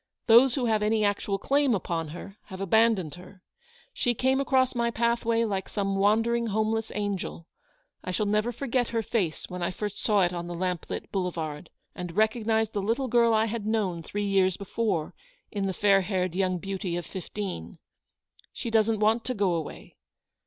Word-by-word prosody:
Those 240 Hz, +2 st, +6 dB
who 260 Hz, -3 st, 0 dB
have 220 Hz, -2 st, +2 dB
any 215 Hz, 0 st, +2 dB
actual 205 Hz, 0 st, 0 dB
claim 275 Hz, +3 st, +2 dB
upon 170 Hz, -4 st, -2 dB
her 175 Hz, +5 st, -9 dB
have 190 Hz, -, -9 dB
abandoned 195 Hz, -4 st, +2 dB
her. 180 Hz, +2 st, -13 dB, 0.5 s
She 245 Hz, -, 0 dB
came 265 Hz, +3 st, +2 dB
across 260 Hz, -2 st, +2 dB
my 235 Hz, -1 st, +1 dB
pathway 235 Hz, 0 st, +1 dB
like 195 Hz, -4 st, -2 dB
some 195 Hz, -2 st, -1 dB
wandering 225 Hz, +4 st, +2 dB
homeless 220 Hz, +1 st, 0 dB
angel. 200 Hz, -5 st, -3 dB, 0.6 s
I -, -, -5 dB
shall 210 Hz, +4 st, 0 dB
never 210 Hz, +3 st, +1 dB
forget 245 Hz, 0 st, -1 dB
her 230 Hz, -1 st, -1 dB
face 195 Hz, -7 st, -1 dB
when 180 Hz, 0 st, -6 dB
I 175 Hz, -, 0 dB
first 205 Hz, +2 st, -5 dB
saw 210 Hz, -3 st, +3 dB
it 175 Hz, 0 st, +1 dB
on 175 Hz, -1 st, -4 dB
the 175 Hz, -, -5 dB
lamplit 180 Hz, -1 st, -3 dB
boulevard, 165 Hz, -5 st, -3 dB, 0.2 s
and 175 Hz, -2 st, -6 dB
recognised 220 Hz, 0 st, +2 dB
the 205 Hz, -, -1 dB
little 235 Hz, +6 st, -1 dB
girl 235 Hz, 0 st, +4 dB
I 220 Hz, 0 st, +3 dB
had 220 Hz, -1 st, -4 dB
known 200 Hz, -6 st, 0 dB
three 205 Hz, +5 st, -3 dB
years 190 Hz, -2 st, +2 dB
before 200 Hz, -5 st, -2 dB, 0.4 s
in 200 Hz, -2 st, -1 dB
the -, -, 0 dB
fair 195 Hz, +1 st, +4 dB
haired 185 Hz, -2 st, -1 dB
young 185 Hz, 0 st, 0 dB
beauty 190 Hz, -1 st, -4 dB
of 175 Hz, -, -4 dB
fifteen. 190 Hz, -, -6 dB, 0.7 s
She 235 Hz, -, -5 dB
doesn't 220 Hz, -1 st, +2 dB
want 220 Hz, +2 st, +3 dB
to 255 Hz, -, -2 dB
go 200 Hz, -4 st, +1 dB
away. 165 Hz, -2 st, -6 dB
205 Hz, 180 wpm, -27 LUFS, 185-225 Hz, 0.7 s, Those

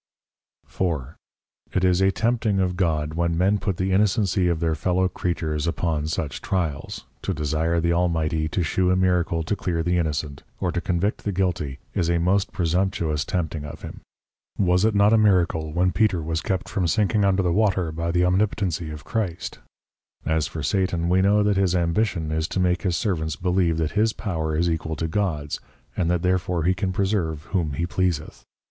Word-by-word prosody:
4. 75 Hz, -7 st, -3 dB, 0.6 s
It 95 Hz, 0 st, +2 dB
is 90 Hz, 0 st, +3 dB
a 95 Hz, -, +5 dB
tempting 110 Hz, 0 st, +1 dB
of 90 Hz, -1 st, 0 dB
God 80 Hz, -4 st, 0 dB
when 85 Hz, 0 st, 0 dB
Men 100 Hz, +4 st, +2 dB
put 95 Hz, -3 st, -2 dB
the 95 Hz, +1 st, 0 dB
Innocency 95 Hz, -2 st, +2 dB
of 85 Hz, -2 st, 0 dB
their 80 Hz, -1 st, +1 dB
Fellow 90 Hz, +4 st, +1 dB
Creatures 85 Hz, -4 st, -2 dB
upon 80 Hz, -3 st, -1 dB
such 80 Hz, -5 st, -3 dB
tryals; 85 Hz, -7 st, -2 dB, 0.2 s
to -, -, -2 dB
desire 80 Hz, +3 st, 0 dB
the 85 Hz, +1 st, +1 dB
Almighty 80 Hz, -2 st, +1 dB
to 90 Hz, +2 st, -1 dB
shew 90 Hz, +3 st, +1 dB
a 90 Hz, -, +3 dB
Miracle 90 Hz, -3 st, +1 dB
to 105 Hz, -, -1 dB
clear 85 Hz, -4 st, -2 dB
the 90 Hz, +1 st, +1 dB
Innocent, 75 Hz, -3 st, -2 dB, 0.2 s
or 90 Hz, -3 st, 0 dB
to 85 Hz, -, -2 dB
convict 90 Hz, +4 st, -1 dB
the 105 Hz, -, -1 dB
Guilty 85 Hz, -7 st, -1 dB, 0.2 s
is 85 Hz, -, 0 dB
a 85 Hz, -, +2 dB
most 95 Hz, +4 st, +1 dB
presumptuous 90 Hz, -4 st, 0 dB
tempting 80 Hz, -1 st, -2 dB
of 75 Hz, +1 st, -9 dB
him. -, -, -8 dB, 0.6 s
Was 90 Hz, 0 st, +3 dB
it 110 Hz, -1 st, +2 dB
not 100 Hz, +2 st, +5 dB
a 110 Hz, -, +5 dB
Miracle 85 Hz, -6 st, +2 dB
when 90 Hz, +3 st, +2 dB
Peter 95 Hz, -7 st, +1 dB
was 80 Hz, 0 st, -2 dB
kept 95 Hz, -2 st, -2 dB
from 95 Hz, -5 st, -1 dB
sinking 105 Hz, +3 st, +2 dB
under 95 Hz, -1 st, +3 dB
the 90 Hz, -2 st, +1 dB
Water 95 Hz, -5 st, +1 dB
by 85 Hz, +2 st, -3 dB
the 90 Hz, +1 st, +2 dB
Omnipotency 90 Hz, -3 st, 0 dB
of 75 Hz, +1 st, -8 dB
Christ? 100 Hz, -8 st, -3 dB, 0.7 s
As 80 Hz, -1 st, +1 dB
for 80 Hz, -, -6 dB
Satan, 85 Hz, +1 st, 0 dB
we 95 Hz, +1 st, +4 dB
know 105 Hz, +2 st, +4 dB
that 105 Hz, -1 st, +2 dB
his 95 Hz, -2 st, +2 dB
Ambition 85 Hz, -1 st, 0 dB
is 80 Hz, 0 st, 0 dB
to 95 Hz, -, -3 dB
make 90 Hz, -1 st, +1 dB
his 90 Hz, -4 st, 0 dB
Servants 80 Hz, -7 st, -1 dB
believe 90 Hz, -2 st, +1 dB
that 80 Hz, -1 st, -1 dB
his 110 Hz, +1 st, +2 dB
Power 80 Hz, -6 st, -2 dB
is 85 Hz, +2 st, +2 dB
equal 80 Hz, -1 st, -2 dB
to 80 Hz, +1 st, -2 dB
God's, 80 Hz, -6 st, -2 dB, 0.4 s
and 85 Hz, -, 0 dB
that 85 Hz, -1 st, 0 dB
therefore 90 Hz, -2 st, 0 dB
he 90 Hz, +3 st, +3 dB
can 95 Hz, 0 st, -2 dB
preserve 90 Hz, -6 st, -1 dB
whom 85 Hz, -7 st, 0 dB
he 85 Hz, +6 st, -1 dB
pleaseth. 85 Hz, -4 st, -2 dB
90 Hz, 190 wpm, -24 LUFS, 80-95 Hz, 0.7 s, a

